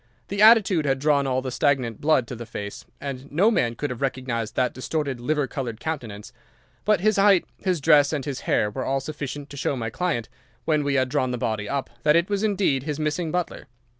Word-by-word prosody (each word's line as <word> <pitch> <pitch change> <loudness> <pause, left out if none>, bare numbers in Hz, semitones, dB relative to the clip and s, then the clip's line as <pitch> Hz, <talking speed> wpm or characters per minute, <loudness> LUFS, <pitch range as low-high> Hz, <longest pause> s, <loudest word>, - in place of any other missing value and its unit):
The 200 +1 -1
attitude 210 -7 +6
had 135 -1 +2
drawn 140 0 +2
all 130 0 0
the 130 - -4
stagnant 130 -5 0
blood 150 -5 +3
to 125 - -7
the 120 0 -8
face, 100 -3 -7
and 135 -1 -6
no 190 +10 +4
man 120 - +1
could 145 +3 -3
have 125 - -6
recognised 130 -4 -2
that 125 - +1
distorted 140 -1 -3
liver 145 +3 0
coloured 125 -4 -5
countenance; 120 -11 -5 0.5
but 210 -3 +3
his 215 +1 +2
height, 195 -2 +5
his 185 -4 0
dress, 145 -1 +5
and 145 -4 -2
his 140 -3 -4
hair 105 - +2
were 130 +5 -4
all 135 +1 0
sufficient 145 0 -6
to 140 - -8
show 140 - -1
my 115 -3 -4
client, 150 -8 -1 0.4
when 155 -2 +2
we 140 -1 0
had 130 -1 +2
drawn 130 -1 0
the 125 - -2
body 110 -3 -2
up, 140 -1 -2
that 150 +4 +4
it 170 +4 +2
was 200 -1 0
indeed 195 -10 +1
his 150 +2 -4
missing 155 +2 -1
butler. 180 -1 -3
140 Hz, 220 wpm, -24 LUFS, 125-160 Hz, 0.5 s, attitude